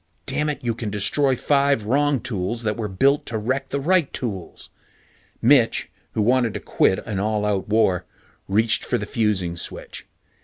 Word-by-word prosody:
Dammit! 150 -2 -1
You 115 - +1
can 115 -1 -5
destroy 130 +7 +1
five 140 -2 +2
wrong 140 +4 +1
tools 115 +2 -3
that 105 -1 0
were 110 -3 -3
built 135 +10 +2
to 115 - -2
wreck 130 +6 -2
the 140 - -2
right 165 +1 +2
tools. 100 -8 -5 0.7
Mitch, 120 -1 +4 0.2
who 110 - +1
wanted 120 -1 +2
to - - -2
quit 95 - +2
an 105 -3 -3
all 105 +1 0
out 105 -1 -1
war, 105 -5 +2 0.4
reached 110 +3 +2
for - - 0
the 105 - -4
fusing 100 -6 0
switch. - - -7
115 Hz, 165 wpm, -22 LUFS, 105-135 Hz, 0.7 s, Mitch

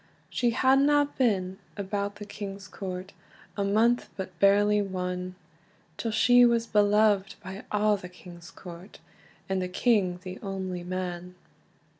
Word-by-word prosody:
She 240 - +1
hadna 275 +4 +3
been 190 -6 0 0.2
about 200 0 -3
the 205 0 -8
king's 200 -1 -7
court 185 0 -7 0.4
A 200 - -1
month, 225 +5 +2
but 185 -3 -7
barely 205 +2 +4
one, 180 -1 -4 0.6
Till 230 - -3
she 245 +3 +5
was 235 -1 +3
beloved 205 -2 +3
by 190 +3 -8
a' 210 0 +3
the 180 -2 -9
king's 175 -1 -13
court, 180 +2 -11 0.5
And 190 -1 -1
the 180 - -3
king 185 -3 +1
the 185 0 -7
only 190 -3 -4
man. 180 0 -5
195 Hz, 135 wpm, -27 LUFS, 185-215 Hz, 0.6 s, she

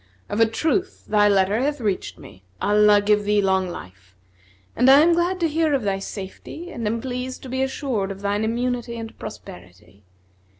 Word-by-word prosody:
Of 205 - -2
a 225 - +5
truth 325 - -1
thy 210 -1 +4
letter 200 +2 +2
hath 290 +1 -1
reached 205 -5 -2
me 95 - -14 0.2
(Allah 210 0 +4
give 210 0 +3
thee 210 0 +2
long 190 -2 +1
life!) 90 - -11 0.6
and 250 +2 +4
I 275 +2 +8
am 340 +2 +5
glad 350 +2 0
to 335 - +3
hear 315 -1 +1
of 260 - -1
thy 195 -1 -1
safety 200 - -8
and 230 -7 -4
am 230 +2 -1
pleased 255 0 -5
to 260 - -8
be 260 +1 -2
assured 265 -6 -2
of 195 0 -7
thine 205 +1 -1
immunity 240 +1 -2
and 225 -1 -7
prosperity. 100 - -11
215 Hz, 185 wpm, -23 LUFS, 195-260 Hz, 0.6 s, I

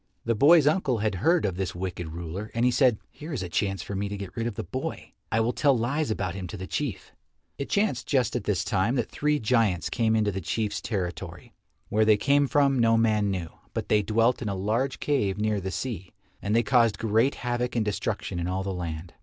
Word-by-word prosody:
The 115 - +2
boy's 145 +7 +6
uncle 145 -5 +2
had 110 0 0
heard 170 -4 +3
of 95 -3 -2
this 95 -2 -3
wicked 90 -2 -4
ruler, 85 +6 -6
and 115 +1 +2
he 125 - +4
said, 125 -3 +4
"Here 155 +3 -9
is 125 - -2
a 90 - -5
chance 95 +2 -1
for - - -6
me 100 +1 -2
to 100 - -4
get 100 -2 -8
rid 115 0 -1
of 115 - -4
the - - -4
boy. 130 +9 -5 0.2
I 110 - +2
will 120 +2 +1
tell 140 -4 +3
lies 140 +6 -1
about 95 -4 -2
him 95 -2 -5
to 95 - -7
the 95 - -6
Chief." 140 +4 -4 0.5
It 140 - -4
chanced 205 0 0
just 130 -6 +1
at - - -2
this - - 0
time 100 +7 +1
that 120 -4 -1
three 150 0 +1
giants 110 - +1
came 110 -2 +2
into 105 -2 +2
the 95 0 -4
Chief's 105 -1 -2
territory. 90 -6 -5 0.4
Where 110 +1 +3
they 110 -1 +5
came 140 +5 +3
from, 140 -1 +3
no 115 -1 +4
man 110 -2 +2
knew, 90 -4 -3 0.3
but - - -3
they 105 - +4
dwelt 115 +4 +2
in 110 - -2
a 100 - -2
large 110 +8 -1
cave 105 -10 0
near 105 -1 0
the 95 - -3
sea, 95 -4 -5 0.3
and 100 +3 0
they 115 - +4
caused 115 -3 +3
great 115 +5 +2
havoc 125 0 -2
and 115 -2 +1
destruction 100 -3 -2
in 85 - -2
all 95 +1 -1
the 95 0 -3
land. 85 -1 -5
110 Hz, 235 wpm, -27 LUFS, 95-125 Hz, 0.5 s, boy's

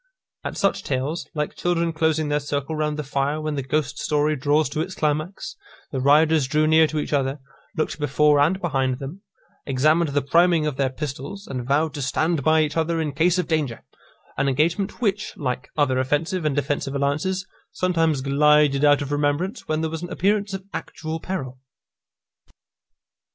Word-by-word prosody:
At - - -5
such 195 - +1
tales, 140 +5 -2
like 150 -1 -2
children 170 -1 0
closing 160 -1 +1
their 145 0 +1
circle 145 +1 -3
round 150 -1 -1
the 150 - -3
fire 140 +2 -1
when 155 0 -3
the 140 - -2
ghost 145 +2 -2
story 150 0 +1
draws 145 +2 +2
to 155 +2 -2
its 185 +3 -4
climax, 155 +5 -2 0.4
the 135 - -2
riders 150 +1 +4
drew 155 +2 +2
near 160 0 +5
to 155 - -4
each 150 - -2
other, 135 0 0 0.4
looked 155 - -1
before 150 0 +3
and 165 +7 +3
behind 135 -7 0
them, 145 +8 -8 0.5
examined 155 +5 +2
the 145 0 0
priming 170 +2 +3
of 150 -3 -2
their 135 -1 +1
pistols, 145 +8 -6
and 125 -3 -5
vowed 150 +3 +1
to 145 - -5
stand 155 +3 0
by 155 +1 +4
each 150 -1 -3
other 165 +1 0
in 155 -2 -1
case 170 +6 +2
of 180 - -1
danger; 150 -8 -1 0.5
an 140 - +2
engagement 170 - 0
which, 205 -1 -1
like 125 -3 -3
other 130 -4 +2
offensive 155 +6 -1
and 150 -3 +1
defensive 145 -1 -1
alliances, 150 +7 -1 0.3
sometimes 165 -6 +1
glided 145 +1 +3
out 145 -1 +5
of 140 - -6
remembrance 145 - -1
when 155 0 0
there 160 -1 -2
was 160 0 -4
an 175 - -6
appearance 205 +2 0
of 190 0 -8
actual 160 0 -5
peril. 135 -9 -5
150 Hz, 180 wpm, -23 LUFS, 140-160 Hz, 0.5 s, near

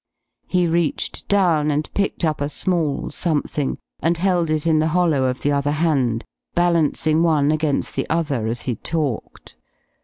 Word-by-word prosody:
He 180 -1 +2
reached 170 -2 -1
down 170 -7 +3
and 150 +1 0
picked 200 -3 0
up 155 -2 -1
a 145 - -1
small 160 -2 -1
something 150 -3 -1 0.2
and 165 +3 +1
held 175 -2 +1
it 155 0 0
in 160 -2 +3
the 155 - +2
hollow 160 -7 +2
of 125 0 -1
the 145 - +1
other 140 +1 +1
hand, 135 -8 +1 0.3
balancing 165 -2 +2
one 155 -3 +3
against 155 -2 -1
the - - -2
other 145 -9 0
as 115 +1 -3
he 125 - -2
talked. 150 -8 -4
155 Hz, 160 wpm, -21 LUFS, 145-170 Hz, 0.3 s, down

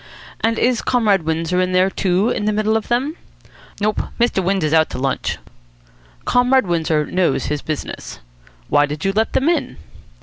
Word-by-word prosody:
"And 225 0 0
is 245 -1 +1
Comrade 210 -8 +2
Windsor 165 +3 0
in 185 0 -1
there, 185 +1 +3
too, 190 +4 +1
in 205 - -2
the 215 - +2
middle 215 +1 +1
of 220 - -1
them?" 265 +7 -1 0.6
"Nope. 210 +1 0 0.2
Mr. 235 -5 +2
Windsor's 180 -4 0
out 160 -1 +4
to - - -6
lunch." 130 0 -2 0.9
"Comrade 250 0 +3
Windsor 160 -3 0
knows 180 -2 0
his 150 -1 -2
business. 155 -2 -6 0.5
Why 145 0 +3
did 150 +5 -5
you 195 - +1
let 220 +2 0
them 270 - +1
in?" 340 - 0
195 Hz, 170 wpm, -19 LUFS, 160-225 Hz, 0.9 s, out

